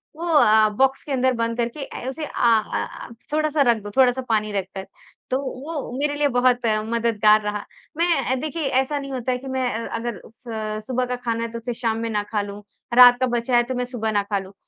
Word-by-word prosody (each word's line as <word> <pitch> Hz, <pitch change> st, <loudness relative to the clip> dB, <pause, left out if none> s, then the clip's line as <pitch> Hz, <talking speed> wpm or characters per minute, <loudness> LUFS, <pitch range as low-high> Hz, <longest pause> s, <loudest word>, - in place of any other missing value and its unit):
वो 335 Hz, +2 st, -5 dB
अ 315 Hz, -3 st, +5 dB, 0.2 s
अ, -, -, +2 dB
बॉक्स 270 Hz, 0 st, +2 dB
के 290 Hz, -, -8 dB
अंदर 260 Hz, -1 st, +2 dB
बंद 230 Hz, -1 st, -2 dB
करके 240 Hz, +4 st, -2 dB
अ, 250 Hz, -, -8 dB
उसे 305 Hz, +4 st, -5 dB
अ -, -, -9 dB, 0.2 s
अ 225 Hz, -2 st, +2 dB, 0.2 s
अ, -, -, -12 dB, 0.2 s
थोड़ा-सा 310 Hz, -1 st, +1 dB
रख 240 Hz, -4 st, +4 dB
दो, 205 Hz, -, -7 dB
थोड़ा-सा 260 Hz, -1 st, +4 dB
पानी 215 Hz, -1 st, +1 dB
रख 195 Hz, -2 st, -1 dB
कर। 190 Hz, 0 st, -6 dB, 0.4 s
तो 260 Hz, -, +1 dB
वो 280 Hz, +1 st, -5 dB
मेरे 290 Hz, +1 st, 0 dB
लिए 290 Hz, 0 st, +2 dB
बहुत 245 Hz, -1 st, +2 dB, 0.2 s
मददगार 220 Hz, -2 st, +3 dB
रहा। 210 Hz, 0 st, -4 dB, 0.3 s
मैं 330 Hz, -6 st, +1 dB
देखिए 310 Hz, +3 st, -4 dB, 0.2 s
ऐसा 285 Hz, +2 st, -3 dB
नहीं 275 Hz, -1 st, -7 dB
होता 255 Hz, -1 st, -2 dB
है 250 Hz, -, 0 dB
कि 265 Hz, +2 st, -10 dB
मैं 260 Hz, -1 st, -1 dB
अ 230 Hz, 0 st, -4 dB
अगर 230 Hz, -4 st, -4 dB
स 220 Hz, -2 st, -6 dB
सुबह 255 Hz, 0 st, 0 dB
का 250 Hz, 0 st, -3 dB
खाना 230 Hz, -2 st, -2 dB
है 230 Hz, -, -4 dB
तो 230 Hz, -, -5 dB
उसे 240 Hz, +1 st, -4 dB
शाम 225 Hz, -1 st, -1 dB
में 230 Hz, 0 st, -3 dB
ना 210 Hz, -2 st, -1 dB
खा 210 Hz, 0 st, -2 dB
लूँ, 205 Hz, 0 st, -7 dB, 0.3 s
रात 245 Hz, 0 st, +8 dB
का 260 Hz, -, +2 dB
बचा 240 Hz, +1 st, 0 dB
है 240 Hz, -, +4 dB
तो 255 Hz, +2 st, -4 dB
मैं 250 Hz, 0 st, -1 dB
सुबह 235 Hz, -3 st, -3 dB
ना 205 Hz, -1 st, +1 dB
खा 200 Hz, 0 st, -1 dB
लूँ। 190 Hz, 0 st, -11 dB
245 Hz, 240 wpm, -22 LUFS, 225-265 Hz, 0.4 s, रात